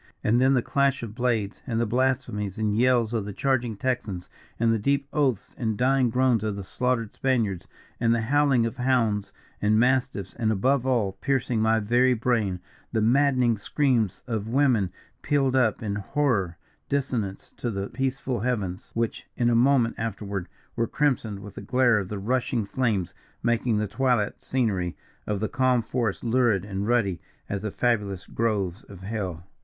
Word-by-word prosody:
And 120 +3 +3
then 135 +1 +4
the 125 - +2
clash 140 -2 +1
of 110 -3 -6
blades, 115 -4 -1
and 115 -3 -1
the 120 - +2
blasphemies 110 -5 -1
and 105 -1 0
yells 120 -1 +3
of 110 -3 0
the 100 0 -6
charging 125 -2 0
Texans, 110 -8 -2 0.3
and 115 0 +3
the 115 - 0
deep 140 +5 +1
oaths 135 -9 0
and 110 -3 -1
dying 130 0 +3
groans 125 -2 +2
of 105 -2 -1
the 100 - -5
slaughtered 115 +1 -1
Spaniards 115 -9 0 0.3
and 115 - +2
the 115 -1 +2
howling 135 0 +3
of 115 - -4
hounds 115 -5 +1 0.3
and 105 +1 +3
mastiffs; 125 -6 +1
and, 110 -2 0
above 130 +5 +1
all, 115 -7 +2
piercing 125 -4 0
my 110 0 +3
very 120 +4 +3
brain, 110 -6 0 0.3
the 115 - +1
maddening 125 -1 +3
screams 120 -3 0
of 110 -3 -3
women 120 -7 +2 0.3
pealed 135 -3 +1
up 120 -4 +2
in 100 -2 -2
horrid 105 -6 0 0.3
dissonance 125 -8 -2
to 120 - -2
the 100 -2 -3
peaceful 130 0 -2
heavens, 100 -6 -2
which, 115 -1 -2
in 120 -1 +2
a - - +3
moment 120 -1 +4
afterward, 100 -4 -3 0.3
were 115 -1 0
crimsoned 125 -8 0
with 105 -1 -10
the - - -8
glare 120 +1 +3
of 95 -2 -5
the 105 - -4
rushing 120 +1 0
flames, 100 -6 -1 0.3
making 120 -1 +1
the 105 - +1
twilight 125 -2 0
scenery 100 -9 -1 0.3
of 105 -2 -1
the 110 - 0
calm 125 0 +2
forest 115 -3 -2
lurid 115 -5 +2
and 100 0 -3
ruddy 110 -8 +1 0.3
as 100 -1 -3
the 110 - -2
fabulous 105 -5 -1
groves 105 -4 -1
of 95 -2 -12
hell! 95 -5 -4
115 Hz, 170 wpm, -26 LUFS, 105-130 Hz, 0.3 s, then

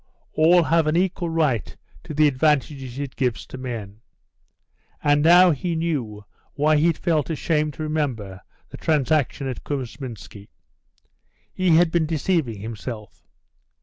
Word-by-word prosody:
All 170 +3 +5
have 165 0 +2
an 155 +2 +2
equal 180 -1 0
right 150 -9 -1 0.3
to 155 - -7
the 150 0 +5
advantages 135 -2 0
it 140 -2 -5
gives 125 -4 -1
to - - -10
men. 110 -5 -6 1.0
And 145 0 +3
now 175 +3 +7
he 165 +3 -2
knew 130 -11 -3 0.3
why 150 +1 +2
he 155 +3 +3
had 165 - +1
felt 160 -3 0
ashamed 155 -2 -1
to 155 - -5
remember 125 -12 -3 0.3
the - - -10
transaction 150 -2 0
at 130 - -6
Kousminski. 115 -6 -7 1.0
He 185 -3 +2
had 170 0 +4
been 165 -2 +1
deceiving 155 - -1
himself. 110 0 -8
150 Hz, 140 wpm, -23 LUFS, 125-160 Hz, 1.0 s, now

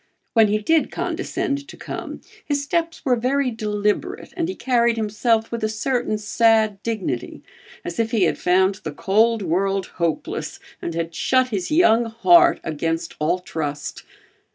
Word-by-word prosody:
When 225 -2 +5
he 210 +1 +1
did 315 +9 +2
condescend 280 -1 -3
to - - -11
come, - - -7 0.2
his 285 -1 -1
steps 330 +3 -2
were 255 -2 +3
very 255 +2 0
deliberate 215 - -2
and 345 -2 -1
he 375 - -4
carried 235 -2 +2
himself 220 +1 0
with 230 -1 -4
a 215 - +1
certain 230 0 -1
sad 220 -1 +2
dignity 195 - -4 0.4
as 175 - -5
if 225 -1 +1
he 225 -4 +2
had 170 - +1
found 190 +2 +2
the 155 - -5
cold 220 +6 +2
world 190 +2 0 0.2
hopeless, 165 -2 -2 0.2
and 170 - -4
had 165 0 -3
shut 255 +8 +2
his 195 -6 -3
young 240 -8 +4
heart 340 +10 +5
against 165 +1 -2
all 160 +4 +1
trust. 150 -5 -5
220 Hz, 155 wpm, -22 LUFS, 190-255 Hz, 0.4 s, When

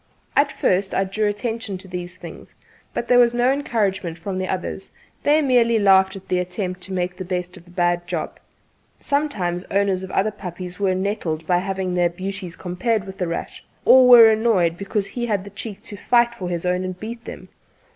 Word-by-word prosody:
At 280 0 +3
first 190 -4 0
I 195 - +2
drew 210 +3 -1
attention 210 -1 -3
to 190 - -10
these 180 0 -6
things, 170 -3 -11 0.4
but 235 - -4
there 245 - +5
was 240 -1 +4
no 245 +2 +3
encouragement 200 - -1
from 185 +2 -4
the 185 - -2
others; 185 +1 -4 0.3
they 300 +1 +3
merely 240 -4 +3
laughed 190 -2 +4
at 195 - -11
the 180 - +1
attempt 180 0 -3
to 195 - -9
make 180 -1 -2
the 185 - -6
best 180 0 -4
of 175 -1 -15
a - - -16
bad 175 0 0
job. 175 -3 -4 0.6
Sometimes 205 -12 -1
owners 195 -2 0
of 190 - -7
other 205 +3 +1
puppies 180 -2 -8
were 190 -2 +1
nettled 185 -5 -2
by 175 +1 +2
having 190 -1 -3
their 175 -1 +2
beauties 185 0 -6
compared 190 +4 -1
with 190 0 -10
"The 180 - -1
Rat," 170 - -5 0.2
or 260 -1 +8
were 240 -2 +10
annoyed 215 -7 +2
because 200 +2 -2
he 240 +2 -4
had 205 -4 0
the 200 - -11
cheek 205 +1 -8
to 220 -3 -8
fight 235 +3 +3
for 185 -6 -5
his 175 0 -3
own 180 +1 0
and 185 -1 -5
beat 230 +3 -7
them. - - -9
190 Hz, 205 wpm, -22 LUFS, 180-220 Hz, 0.6 s, were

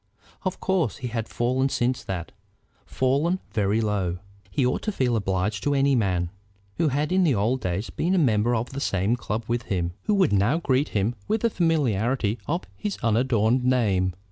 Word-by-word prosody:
Of 185 -3 -3
course 180 - 0
he 125 - -5
had 115 -1 -3
fallen 130 +3 +1
since 125 0 0
that, 90 -3 -4 0.6
fallen 140 +8 +1
very 105 0 +1
low. 100 -5 -1 0.3
He 135 +5 +1
ought 125 - 0
to 215 - -2
feel 125 - +1
obliged 100 0 -1
to 145 0 +1
any 140 0 +3
man, 90 -6 0 0.5
who 165 - +2
had 150 +3 0
in 185 0 +3
the 150 -7 +3
old 115 +6 +1
days 90 +4 -2
been 180 +3 0
a - - +2
member 120 -6 +3
of 115 +2 -2
the 140 +1 -5
same 100 +2 +1
club 110 -2 -3
with 120 +1 -1
him, 85 -3 -1
who 210 - +2
would 185 - +3
now 100 +10 +3
greet 140 -3 +1
him 105 +4 +1
with 220 0 0
the 230 - +2
familiarity 125 - +1
of 170 +4 -1
his 210 -2 -3
unadorned 115 +1 +2
name. 100 -8 +2
120 Hz, 190 wpm, -25 LUFS, 105-145 Hz, 0.6 s, any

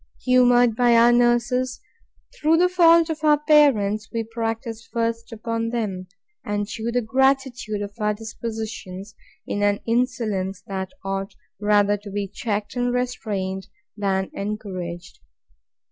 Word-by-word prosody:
Humoured 245 -2 +4
by 240 0 +4
our 235 +1 +6
nurses, 240 +1 +2 0.6
through 325 -7 +3
the 360 +2 +4
faults 335 -2 +5
of 315 0 -6
our 300 -1 +5
parents, 245 -9 +3
we 230 -1 -2
practise 225 0 -4
first 230 0 -3
upon 230 0 -3
them; 205 -6 -3 0.4
and 205 0 -2
shew 225 +2 -4
the 245 0 0
gratitude 260 -3 +1
of 200 0 -7
our 210 0 +1
dispositions, 215 -3 -6 0.3
in 205 - -3
an 205 0 +2
insolence 220 -6 -1
that 190 -1 -4 0.2
ought 195 0 -3 0.2
rather 205 0 +3
to 205 0 -11
be 200 0 -3
checked 205 +2 -4
and 245 0 0
restrained, 205 -6 -3 0.3
than 195 -2 -1
encouraged. 185 -4 -6
225 Hz, 130 wpm, -23 LUFS, 205-245 Hz, 0.6 s, our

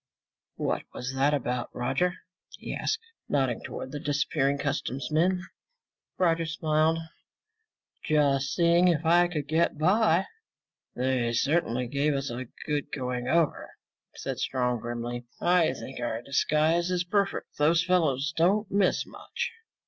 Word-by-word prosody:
"What - - -1
was 125 +2 -4
that 135 +2 +2
about, 125 -4 -1
Roger?" 135 +9 0 0.4
he - - -6
asked, 440 - -1 0.3
nodding 130 -5 +1
toward 130 - -6
the 145 - -4
disappearing 140 -1 0
customs 140 -2 -3
men. 180 +4 +2 0.7
Roger 165 -2 +2
smiled. 160 0 +1 1.1
"Just 140 -2 +2
seeing 170 +1 +4
if 165 -2 +2
I 175 +2 +5
could 150 -5 -4
get 160 +1 +1
by." 185 +2 +3 0.7
"They 125 -2 0
certainly 125 -2 +1
gave 140 +4 0
us 135 -2 -2
a 125 +1 -5 0.2
good 150 -2 -2
going 125 -2 -3
over," 165 +2 +1 0.5
said - - -4
Strong 125 -2 0
grimly. 120 +1 -4
"I 175 -2 +3
think 135 - -8
our 120 -1 -3
disguise 155 +6 +2
is 180 -1 +1
perfect. 200 +2 -1
Those 165 +3 +4
fellows 160 -5 +1
don't 195 +6 +2
miss 200 -2 +2
much." 480 - -5
150 Hz, 135 wpm, -28 LUFS, 130-170 Hz, 1.1 s, I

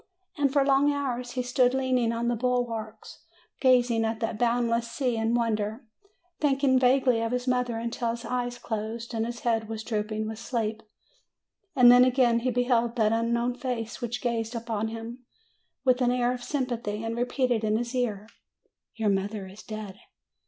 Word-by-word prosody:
And 285 -3 +1
for 280 -1 +3
long 280 +1 +4
hours 250 -4 -3
he 250 - -1
stood 250 +1 +2
leaning 255 -3 +1
on 235 +1 -2
the 240 - +1
bulwarks, 235 -2 -3 0.4
gazing 245 -3 +3
at 225 0 -1
that 225 -2 -3
boundless 235 -1 +1
sea 250 -2 -1
in 225 +1 0
wonder, 220 0 -1 0.5
thinking 270 -3 +3
vaguely 255 -2 +3
of 230 0 -1
his 250 +1 -2
mother 250 -2 0
until 235 +1 -2
his 235 +1 -4
eyes 245 0 -2
closed 225 +1 -5
and 225 0 -1
his 240 0 -6
head 225 -2 0
was 220 -1 -5
drooping 215 -1 -2
with 220 0 -6
sleep; 225 -2 -2 0.9
and 245 -3 +8
then 245 0 +8
again 250 -2 +3
he 250 +2 -1
be 245 0 +1
held 240 -1 +1
that 220 -3 +2
unknown 235 +2 0
face 245 -2 -4
which 240 +1 -4
gazed 230 -1 -1
upon 225 -2 -2
him 225 +2 -7 0.7
with 255 0 +3
an 245 - +3
air 245 0 +1
of 250 - -6
sympathy, 240 -6 -3
and 225 0 -3
repeated 245 -1 0
in 215 0 +2
his 235 +2 -3
ear, 220 -5 -2 0.7
"Your 220 -2 +1
mother 200 +1 -1
is 190 +3 -12
dead 215 -3 -8
235 Hz, 175 wpm, -27 LUFS, 225-250 Hz, 0.9 s, and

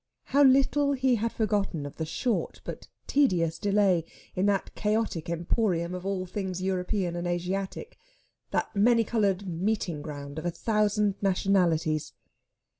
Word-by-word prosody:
How 280 +2 +2
little 275 +2 +4
he 260 -2 +2
had 230 +2 -1
forgotten 200 -8 -1
of 145 - -8
the 160 - -3
short 235 +7 -1
but - - -7 0.2
tedious 180 - +2
delay 200 -4 +3 0.3
in 185 +2 +1
that 200 -1 0
chaotic 210 -6 -1
emporium 170 0 0
of 180 +1 -5
all 190 -2 -1
things 185 -1 -4
European 185 -1 -1
and 175 0 -3
Asiatic, 190 - -3 0.5
that - - -2
many 230 +3 +4
coloured 200 -3 0
meeting 180 -2 -1
ground 145 -1 -6
of 155 - -8
a - - +2
thousand 210 +2 0
nationalities! 175 -6 +1
195 Hz, 140 wpm, -28 LUFS, 175-215 Hz, 0.5 s, little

